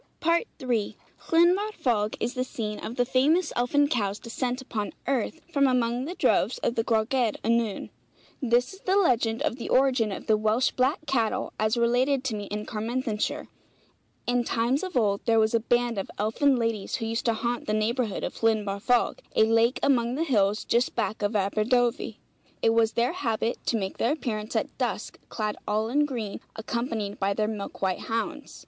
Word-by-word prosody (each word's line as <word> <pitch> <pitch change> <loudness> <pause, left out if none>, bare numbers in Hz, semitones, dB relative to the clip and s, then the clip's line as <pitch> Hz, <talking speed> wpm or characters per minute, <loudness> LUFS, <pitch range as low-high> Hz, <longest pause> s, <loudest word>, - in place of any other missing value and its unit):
III. 260 - 0 0.3
Llyn 340 +2 +5
Barfog 250 - -1
is 240 +3 -1
the 255 - -1
scene 215 -4 -5
of 230 - -5
the 245 - +2
famous 290 +7 +2
elfin 285 +4 +2
cow's 205 -8 -1
descent 245 +2 -3
upon 220 -5 -4
earth, 275 +4 -1
from 280 -2 +4
among 250 0 +1
the 350 +5 -5
droves - - +2
of - - +1
the 225 - 0
Gwragedd 225 0 +1
Annwn. 230 -2 0 0.5
This 245 +2 +2
is 380 - -13
the 380 -1 0
legend 235 - +2
of 235 - -1
the 240 - -6
origin 255 -5 +3
of 195 - -6
the 220 - +4
Welsh 220 +4 +2
black 265 +4 0
cattle, 235 -6 0
as 215 +2 +1
related 250 +3 +2
to 255 -5 -2
me 205 -1 -5
in 210 +1 -4
Carmarthenshire: 225 -1 -2 0.8
In 245 0 +1
times 240 +4 0
of 370 -7 -3
old 200 -4 +2
there 230 -1 +3
was 220 +1 +2
a 230 - +4
band 240 -1 +1
of 195 - -5
elfin 245 +7 +2
ladies 230 -4 -1
who 225 - -3
used 225 +1 -2
to 230 - +3
haunt 235 +2 -2
the - - 0
neighbourhood 220 0 0
of - - -5
Llyn 220 -2 +2
Barfog, 215 +5 +1 0.2
a - - +6
lake 225 +2 +3
among 245 -3 +2
the 315 - 0
hills 210 -7 +1
just 240 +2 +1
back 215 - -1
of 205 +2 0
Aberdovey. 225 +5 +1 0.5
It 225 - +5
was 225 -1 +3
their 240 +7 +1
habit 230 -8 -2
to 230 - +2
make 190 -2 -4
their 240 - +2
appearance 220 -7 -4
at - - -1
dusk - - -3
clad 215 -2 -3
all 215 +2 0
in 295 +4 +3
green, 230 -7 -4 0.2
accompanied 220 -2 -3
by 200 0 0
their 215 0 +1
milk 210 -2 -5
white 185 -1 +1
hounds. 230 +7 -4
235 Hz, 185 wpm, -27 LUFS, 215-255 Hz, 0.8 s, a